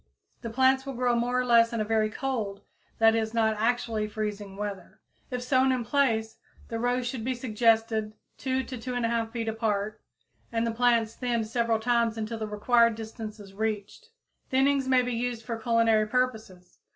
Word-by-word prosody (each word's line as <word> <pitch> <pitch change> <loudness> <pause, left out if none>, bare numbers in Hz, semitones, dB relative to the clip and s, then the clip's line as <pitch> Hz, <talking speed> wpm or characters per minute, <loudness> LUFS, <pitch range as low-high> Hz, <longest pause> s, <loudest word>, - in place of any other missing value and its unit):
The 230 - -5
plants 265 +2 +3
will 275 -1 -6
grow 245 0 +1
more 245 +1 +1
or 250 - 0
less 230 -1 +5
in 230 -2 -1
very 215 0 +1
cold, 215 -5 -3 0.4
that 225 0 +5
is, 225 0 -1
not 220 -1 +2
actually 225 -2 0
freezing 210 -2 -4
weather. 200 -3 -6 0.3
If 250 -1 -3
sown 260 +1 +3
in 250 -2 -1
place, 225 -4 +1 0.3
the 230 - -3
rows 245 +1 0
should 245 -2 -4
be 255 +2 -1
the - - -12
suggested 220 -2 +1 0.2
2 260 0 -1
to 255 0 -7
2 250 +2 -5
1/2 230 -2 -1
feet 230 -1 -3
apart, 215 -1 -1 0.5
and 230 0 0
the 230 - 0
plants 230 -1 +2
thinned 235 -3 -1
several 230 0 0
times 235 -1 +1
until 220 +1 -4
the 215 - -3
required 230 +2 +3
distance 220 -1 -7
is 195 -1 -12
reached. 215 - -4 0.4
Thinnings 270 0 +2
may 255 -1 +4
be 250 0 -2
used 235 -1 -2
for 235 - -3
culinary 225 -1 +2
purposes. 220 -7 -2
230 Hz, 180 wpm, -27 LUFS, 220-245 Hz, 0.5 s, less